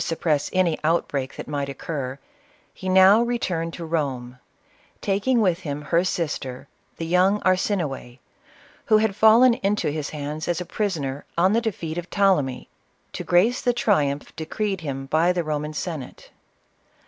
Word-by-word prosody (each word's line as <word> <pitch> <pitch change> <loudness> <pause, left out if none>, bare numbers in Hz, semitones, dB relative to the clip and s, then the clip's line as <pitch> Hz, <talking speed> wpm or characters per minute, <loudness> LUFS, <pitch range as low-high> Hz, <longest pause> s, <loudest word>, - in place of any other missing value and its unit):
suppress 155 -3 0
any 185 -4 +1
outbreak 145 -4 0
that - - -7
might 140 -1 -3
occur, 135 -2 -5 0.6
he 185 - -5
now 190 +4 +7
re 240 0 0
turned 165 -6 -2
to 165 -1 -7
Eorne, 130 -6 -3 0.6
taking 205 +6 +1
with 185 -6 +2
him 145 -1 -5
her 170 +4 +2
sister, 145 -7 -3 0.3
the 165 - -4
young 185 +4 +3
Arsinoe, 180 - -1 0.7
who 215 - +5
had 215 -2 +1
fallen 225 +4 +6
into 200 -5 0
his 150 -1 -4
hands 150 +1 -5
as 175 -2 0
a 180 - -4
prisoner 150 -10 -3
on 185 +4 +4
the 230 - +2
defeat 175 -7 -3
of 175 - -9
Ptolemy, 165 -11 +1 0.5
to - - -5
grace 205 +8 +3
the 245 - +2
triumph 150 -12 0
decreed 190 +4 -3
him 135 -3 -4
by 160 +5 +2
the 180 -1 -1
Koman 150 0 -3
Senate. 150 -5 -6
165 Hz, 155 wpm, -23 LUFS, 145-195 Hz, 0.7 s, now